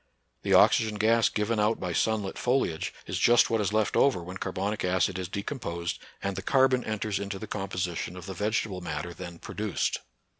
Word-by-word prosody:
The - - +3
oxygen 110 -1 +5
gas 115 +2 +4
given 105 +1 0
out 105 +2 +2
by 90 -1 -3
sun 110 +3 +1
lit 95 - -5
foliage 125 -11 0
is - - -3
just 120 -1 +5
what 115 -1 +2
is 100 -1 0
left 110 -1 +1
over 130 -11 +3
when 90 +2 -7
carbonic 95 +3 -2
acid 95 +1 +1
is 90 - -3
decomposed 100 -5 -4 0.2
and 100 0 -1
the 95 - -4
carbon 130 +3 +3
enters 110 -2 -2
into 100 0 -4
the 110 - -6
composition 90 -4 -3
of 90 - -8
the 95 - -5
vegetable 105 -2 -1
matter 85 +1 -4
then 85 -1 -8
produced. 105 +2 -2
100 Hz, 190 wpm, -28 LUFS, 90-110 Hz, 0.2 s, oxygen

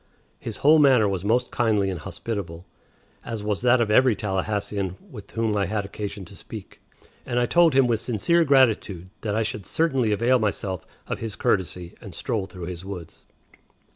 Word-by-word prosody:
His - - -6
whole 155 +2 +5
manner 130 -7 +5
was 95 -2 -2
most 120 +4 +1
kindly 105 -5 +1
and 90 - -5
hospitable, 85 0 -6 0.6
as 115 -3 -5
was 105 -1 -1
that 125 0 +4
of 110 -2 +1
every 125 +1 +5
Tallahassean 100 -1 -2 0.2
with 105 -5 -10
whom 110 -2 -1
I 100 -2 +1
had 105 0 -2
occasion 100 -1 -6
to 100 - -13
speak, 105 +1 -10 0.4
and 120 - -3
I 120 - +3
told 170 +1 +4
him 135 -1 +6
with 115 -3 +1
sincere 125 +10 +2
gratitude 110 - +2
that 105 -2 -2
I 110 - +2
should 105 -3 -5
certainly 135 -9 +1
avail 120 +5 +3
myself 100 -4 -2 0.2
of - - -4
his 110 -3 -5
courtesy 90 -2 -1
and - - -10
stroll 100 -4 -2
through 90 -3 -8
his 90 0 -6
woods. 90 -4 -9
105 Hz, 180 wpm, -24 LUFS, 95-120 Hz, 0.6 s, him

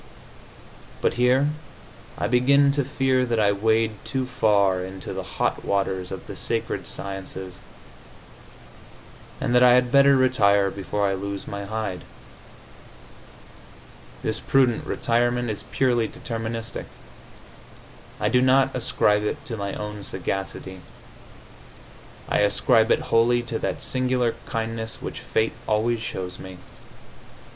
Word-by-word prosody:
But - - +1
here 125 +4 +3 0.7
I - - -1
begin 140 +4 +4
to 140 0 0
fear 130 -1 +1
that 115 -1 0
I 100 -1 +4
wade 110 +1 +1
too 130 -1 -2
far 100 -6 +2
into 95 0 -7
the - - -3 0.2
hot - - 0
waters 95 -2 -1
of 95 - -7
the - - -8
sacred - - -3
sciences, 95 -2 -6 1.8
and - - -1
that 125 - +5
I 125 -1 +7
had 125 -1 +2
better 140 0 +6
retire 100 -7 +3
before 100 +1 -2
I 95 - 0
lose 100 +1 -5
my 100 0 -5
hide. 105 -3 -4 2.2
This - - -1
prudent 130 -4 +2
retirement 120 0 0
is 105 - -6
purely 120 -4 +1
deterministic. 115 0 -5 1.3
I 105 - +1
do 125 +3 +3
not 130 +1 +3
ascribe 105 -4 +2
it 140 +7 -3
to 120 -7 -4
my 100 -2 -4
own 105 0 -6
sagacity; 95 0 -4 1.5
I - - +1
ascribe 110 +3 +3
it - - 0
wholly 120 +1 +4
to 115 -1 -4
that - - -3
singular 125 -2 0
kindness 110 0 -4
which - - -6
fate 110 - 0
always 115 +2 +1
shows 95 -4 -5
me. 95 -1 -9
110 Hz, 125 wpm, -24 LUFS, 100-125 Hz, 2.2 s, I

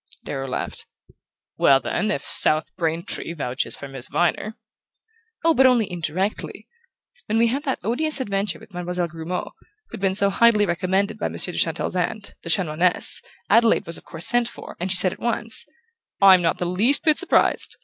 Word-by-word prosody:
Darrow 135 -1 -5
laughed. 130 - -5 0.7
"Well, 135 -1 +4
then, 210 +10 -2
if 140 -9 -2
South 155 +1 +4
Braintree 170 -1 -2
vouches 130 -6 -4
for 140 - -9
Miss 135 -2 -6
Viner 200 +5 -1 0.4
" 450 -3 -23
"Oh, 330 - +5
but 265 -3 +5
only 230 -6 +1
indirectly. 180 +4 -4 0.6
When 220 - 0
we 230 0 +3
had 275 +5 -3
that 265 - -1
odious 275 - 0
adventure 200 -4 -2
with 200 - -18
Mademoiselle 180 0 -3
Grumeau, 165 +3 -6 0.4
who'd - - -9
been 190 -1 0
so 200 0 +3
highly 215 0 +3
recommended 190 +3 -1
by - - -1
Monsieur 180 - 0
de - - -3
Chantelle's 165 +2 0
aunt, 195 +3 -3
the 165 - -8
Chanoinesse, 170 0 +3 0.3
Adelaide 230 +1 +3
was 165 -1 -5
of - - -22
course 165 +1 -5
sent 240 -1 +3
for, - - -11
and 180 +2 -3
she 180 - +2
said 185 -1 +3
at - - -15
once: 230 -1 0 0.5
'I'm 190 -2 +7
not 165 -1 0
the 180 - -3
least 205 +11 +3
bit 310 -2 +3
surprised. 370 - +1
190 Hz, 180 wpm, -22 LUFS, 170-230 Hz, 0.7 s, I'm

